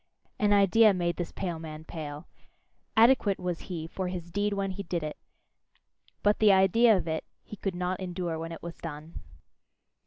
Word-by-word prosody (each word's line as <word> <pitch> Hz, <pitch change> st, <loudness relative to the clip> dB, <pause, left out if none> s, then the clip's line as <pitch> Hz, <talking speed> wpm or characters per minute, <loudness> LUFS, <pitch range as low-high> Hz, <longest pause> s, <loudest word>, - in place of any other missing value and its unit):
An 210 Hz, -1 st, +3 dB
idea 205 Hz, +1 st, +5 dB
made 175 Hz, -2 st, -1 dB
this 175 Hz, -2 st, -4 dB
pale 175 Hz, -4 st, -4 dB
man 155 Hz, -1 st, -8 dB
pale. 150 Hz, -3 st, -7 dB, 0.7 s
Adequate 225 Hz, -4 st, +5 dB
was 180 Hz, -2 st, -3 dB
he 165 Hz, -3 st, -4 dB
for 185 Hz, +3 st, -4 dB
his 175 Hz, -2 st, -6 dB
deed 205 Hz, +3 st, 0 dB
when 195 Hz, -1 st, -1 dB
he 195 Hz, +2 st, -5 dB
did 170 Hz, -3 st, -3 dB
it, 150 Hz, -1 st, -4 dB, 1.1 s
but 205 Hz, 0 st, +3 dB
the 215 Hz, -2 st, +6 dB
idea 195 Hz, +4 st, +5 dB
of 175 Hz, -, -4 dB
it, 160 Hz, 0 st, -2 dB, 0.2 s
he -, -, -9 dB
could 195 Hz, -2 st, -3 dB
not 180 Hz, +1 st, -2 dB
endure 175 Hz, -3 st, -3 dB
when 165 Hz, +1 st, -5 dB
it 165 Hz, -, -9 dB
was 170 Hz, 0 st, -7 dB
done. 155 Hz, 0 st, -8 dB
180 Hz, 180 wpm, -28 LUFS, 165-200 Hz, 1.1 s, the